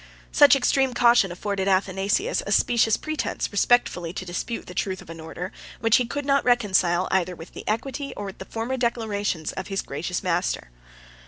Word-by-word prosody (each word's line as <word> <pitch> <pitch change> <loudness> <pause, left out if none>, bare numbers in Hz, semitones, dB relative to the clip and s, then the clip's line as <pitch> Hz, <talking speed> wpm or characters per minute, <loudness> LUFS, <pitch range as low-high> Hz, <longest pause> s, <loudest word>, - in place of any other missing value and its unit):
Such 290 -1 +7
extreme 265 -1 +2
caution 235 -6 +5
afforded 195 +2 -3
Athanasius 195 - +1
a - - -3
specious 225 -2 +3
pretence 310 0 -3
respectfully 205 -5 +2
to 185 - -5
dispute 185 +6 -4
the 180 - -9
truth 185 0 -2
of - - -11
an 165 - -9
order, 165 +3 -6 0.3
which 225 0 +4
he 245 - 0
could 285 +4 -4
not 275 0 +3
reconcile, 190 -7 +2
either 185 -1 +1
with 165 +1 -12
the - - -8
equity, 270 +6 -2
or 205 - -4
with 195 - -8
the 190 - -7
former 230 +5 -3
declarations, 210 -9 -1
of 190 - -6
his 195 -1 -2
gracious 170 +7 -4
master. 175 - -1
205 Hz, 180 wpm, -24 LUFS, 180-245 Hz, 0.3 s, Such